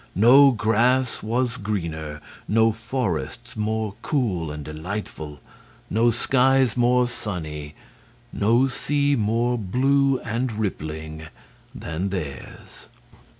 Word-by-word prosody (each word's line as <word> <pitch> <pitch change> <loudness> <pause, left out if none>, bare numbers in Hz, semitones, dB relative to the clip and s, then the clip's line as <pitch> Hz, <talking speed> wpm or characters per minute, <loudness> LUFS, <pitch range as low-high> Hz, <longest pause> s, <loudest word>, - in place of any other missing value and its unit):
No 130 +8 +7
grass 120 +2 +1
was 120 +3 -1
greener, 80 -8 -4 0.3
no 115 +1 +4
forests 115 -5 -4
more 110 -1 -2
cool 100 - -1
and 75 -1 -6
delightful, 80 -1 -6 0.5
no 115 +3 +3
skies 130 +1 +3
more 125 0 +3
sunny, 80 -10 -6 0.6
no 115 +5 +3
sea 145 +2 0
more 115 +2 +1
blue 135 +6 +2
and 120 +3 -2
rippling 80 -6 -4 0.5
than 85 +4 -3
theirs. 75 -9 -7
110 Hz, 100 wpm, -23 LUFS, 85-125 Hz, 0.6 s, No